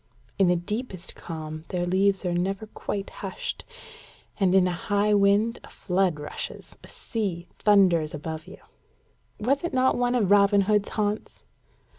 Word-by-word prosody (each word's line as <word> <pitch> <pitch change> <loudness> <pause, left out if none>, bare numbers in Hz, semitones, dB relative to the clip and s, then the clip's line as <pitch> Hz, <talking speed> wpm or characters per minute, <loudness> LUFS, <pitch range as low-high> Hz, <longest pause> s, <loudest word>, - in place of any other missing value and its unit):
In 190 - +5
the 180 - +4
deepest 190 +1 -4
calm 155 -2 -7
their 175 -1 -1
leaves 195 +2 +2
are 175 - 0
never 195 +4 -1
quite 205 -2 -5
hushed, - - -6 0.7
and 190 -2 +3
in 190 -1 +5
a - - 0
high 205 +4 +1
wind 205 +3 +3
a - - -13
flood 180 -4 0
rushes 150 - -7
a - - -12
sea 190 -7 -4
thunders 180 -7 +4
above 160 +2 -6
you." - - -11 0.8
"Was 270 +8 +1
it 340 - -2
not 260 0 +3
one 245 0 +1
of 205 -6 +1
Robin 200 0 +5
Hood's 210 +1 +1
haunts?" 210 0 -3
195 Hz, 155 wpm, -26 LUFS, 175-210 Hz, 0.8 s, In